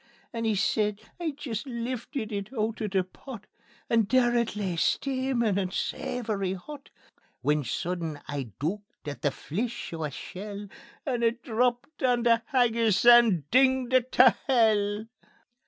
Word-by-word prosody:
And 230 Hz, -1 st, -2 dB
he 220 Hz, -, +2 dB
says: 210 Hz, +1 st, +1 dB, 0.2 s
"I'd 320 Hz, -5 st, -3 dB
jist 225 Hz, -5 st, -5 dB
liftit 240 Hz, 0 st, -4 dB
it 200 Hz, +1 st, -4 dB
oot 225 Hz, -2 st, -2 dB
o' 215 Hz, -, 0 dB
the 190 Hz, -2 st, +1 dB
pot, 210 Hz, +4 st, -11 dB, 0.4 s
And 225 Hz, -3 st, +2 dB
there 245 Hz, -2 st, +3 dB
it 235 Hz, -3 st, 0 dB
lay 195 Hz, -4 st, -2 dB
steamin' 255 Hz, 0 st, +1 dB
and 185 Hz, -2 st, -2 dB
savoury 210 Hz, -6 st, -2 dB
hot, 275 Hz, +10 st, -10 dB, 0.5 s
When 150 Hz, 0 st, +2 dB
sudden 165 Hz, +3 st, -3 dB
I 140 Hz, -4 st, -4 dB
dooked 200 Hz, +4 st, -5 dB
at 145 Hz, -5 st, -5 dB
the 145 Hz, -, +2 dB
fleech 215 Hz, -, -4 dB
o' 160 Hz, -1 st, -4 dB
a -, -, -2 dB
shell, 200 Hz, +8 st, -7 dB, 0.4 s
And 245 Hz, -4 st, -1 dB
it 235 Hz, +1 st, +1 dB
_DRAPPED 245 Hz, +5 st, -1 dB
ON 245 Hz, -2 st, +3 dB
THE 230 Hz, -1 st, +4 dB
HAGGIS 235 Hz, -6 st, +2 dB
AND 235 Hz, -, +6 dB
DINGED 260 Hz, 0 st, +3 dB
IT 255 Hz, 0 st, +3 dB
TAE 255 Hz, -1 st, +7 dB
HELL. 215 Hz, -4 st, +2 dB
225 Hz, 155 wpm, -28 LUFS, 195-245 Hz, 0.5 s, TAE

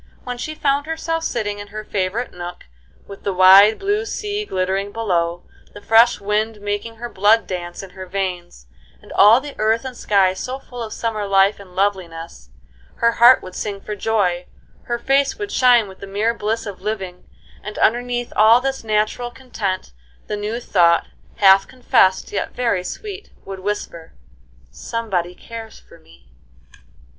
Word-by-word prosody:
When 245 Hz, -1 st, -6 dB
she 310 Hz, +4 st, -5 dB
found 285 Hz, 0 st, 0 dB
herself 325 Hz, 0 st, -2 dB
sitting 205 Hz, -7 st, -2 dB
in 205 Hz, -, -8 dB
her 215 Hz, +1 st, -7 dB
favorite 205 Hz, +5 st, -2 dB
nook, 175 Hz, 0 st, -8 dB, 0.4 s
with 200 Hz, -1 st, -10 dB
the 200 Hz, -, -2 dB
wide, 195 Hz, +4 st, +7 dB
blue 410 Hz, +2 st, 0 dB
sea 420 Hz, -1 st, -4 dB
glittering 190 Hz, -, -2 dB
below, 175 Hz, -6 st, -1 dB, 0.3 s
the 205 Hz, -, -10 dB
fresh 230 Hz, +2 st, +5 dB
wind 210 Hz, +2 st, -1 dB
making 205 Hz, +2 st, -4 dB
her 240 Hz, +2 st, -6 dB
blood 215 Hz, +1 st, +3 dB
dance 175 Hz, 0 st, -6 dB
in 190 Hz, -, -11 dB
her 185 Hz, 0 st, -9 dB
veins, 180 Hz, -, -4 dB, 0.3 s
and -, -, -16 dB
all 215 Hz, +4 st, +7 dB
the 285 Hz, +1 st, -8 dB
earth 220 Hz, +3 st, +1 dB
and 255 Hz, -1 st, -6 dB
sky 195 Hz, -5 st, +2 dB
so 255 Hz, +7 st, -5 dB
full 245 Hz, -2 st, -10 dB
of 220 Hz, -2 st, -5 dB
summer 215 Hz, -3 st, -3 dB
life 195 Hz, +1 st, +3 dB
and 185 Hz, -3 st, -14 dB
loveliness, 170 Hz, -, -3 dB, 0.5 s
her 235 Hz, -, +2 dB
heart 240 Hz, +2 st, +6 dB
would 185 Hz, -, -9 dB
sing 200 Hz, 0 st, -4 dB
for 210 Hz, +1 st, -6 dB
joy, 195 Hz, -5 st, 0 dB, 0.4 s
her 240 Hz, -, -2 dB
face 275 Hz, +3 st, +1 dB
would 410 Hz, -1 st, -5 dB
shine 245 Hz, -4 st, +4 dB
with 190 Hz, -1 st, -13 dB
the 200 Hz, -, -9 dB
mere 210 Hz, +4 st, 0 dB
bliss 225 Hz, 0 st, -2 dB
of 200 Hz, -3 st, -8 dB
living, 190 Hz, -4 st, -5 dB, 0.3 s
and 210 Hz, -, -7 dB
underneath 245 Hz, +1 st, 0 dB
all 220 Hz, +3 st, +6 dB
this 270 Hz, 0 st, -3 dB
natural 215 Hz, +3 st, 0 dB
content 210 Hz, -, -5 dB, 0.3 s
the -, -, -3 dB
new 210 Hz, +3 st, -3 dB
thought, 170 Hz, -7 st, +2 dB, 0.3 s
half 195 Hz, -1 st, +5 dB
confessed, 245 Hz, -7 st, +2 dB
yet 205 Hz, -, -3 dB
very 230 Hz, -7 st, 0 dB
sweet, 410 Hz, -, -7 dB, 0.2 s
would 195 Hz, -1 st, -7 dB
whisper, 185 Hz, -4 st, -5 dB, 0.6 s
"Somebody 180 Hz, -, -3 dB
cares 225 Hz, +1 st, -10 dB
for 170 Hz, -, -19 dB
me." 65 Hz, -, -22 dB
210 Hz, 165 wpm, -20 LUFS, 190-240 Hz, 0.6 s, wide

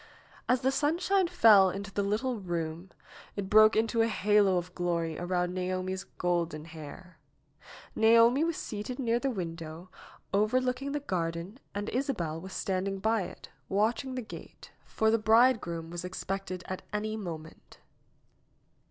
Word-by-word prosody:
As 250 Hz, 0 st, +3 dB
the 265 Hz, 0 st, +2 dB
sunshine 345 Hz, +7 st, +2 dB
fell 220 Hz, -, +6 dB
into 195 Hz, +1 st, -6 dB
the 205 Hz, -, 0 dB
little 220 Hz, +4 st, -1 dB
room 170 Hz, -1 st, -4 dB, 0.5 s
it 195 Hz, -1 st, -4 dB
broke 215 Hz, +1 st, +7 dB
into 225 Hz, +1 st, +2 dB
a 225 Hz, -, +3 dB
halo 205 Hz, -3 st, +3 dB
of 180 Hz, +1 st, -4 dB
glory 170 Hz, -3 st, -1 dB
around 180 Hz, 0 st, -1 dB
Naomi's 185 Hz, +1 st, -3 dB
golden 170 Hz, -3 st, -1 dB
hair. 165 Hz, +3 st, -11 dB, 0.8 s
Naomi 230 Hz, +5 st, +5 dB
wlo 335 Hz, -, +1 dB
seated 225 Hz, -5 st, -5 dB
near 235 Hz, -3 st, +1 dB
the 275 Hz, -, -1 dB
window 165 Hz, -4 st, -6 dB, 0.4 s
overlooking 255 Hz, +6 st, +1 dB
the 295 Hz, -, 0 dB
garden 175 Hz, 0 st, -3 dB, 0.2 s
an 205 Hz, 0 st, -2 dB
^oabel 205 Hz, -, -2 dB
was 190 Hz, +2 st, -9 dB
standing 195 Hz, +1 st, -2 dB
by 220 Hz, +2 st, +1 dB
it, -, -, -11 dB, 0.2 s
watching 225 Hz, +6 st, 0 dB
the 250 Hz, -, -3 dB
gate, 220 Hz, -, -11 dB
for 220 Hz, 0 st, +1 dB
the 225 Hz, -, +3 dB
bridegroom 215 Hz, -7 st, +3 dB
was 175 Hz, 0 st, -5 dB
expected 185 Hz, 0 st, -4 dB
at 185 Hz, -, -4 dB
any 215 Hz, +1 st, -2 dB
moment. 165 Hz, -6 st, -8 dB
200 Hz, 145 wpm, -30 LUFS, 175-230 Hz, 0.8 s, broke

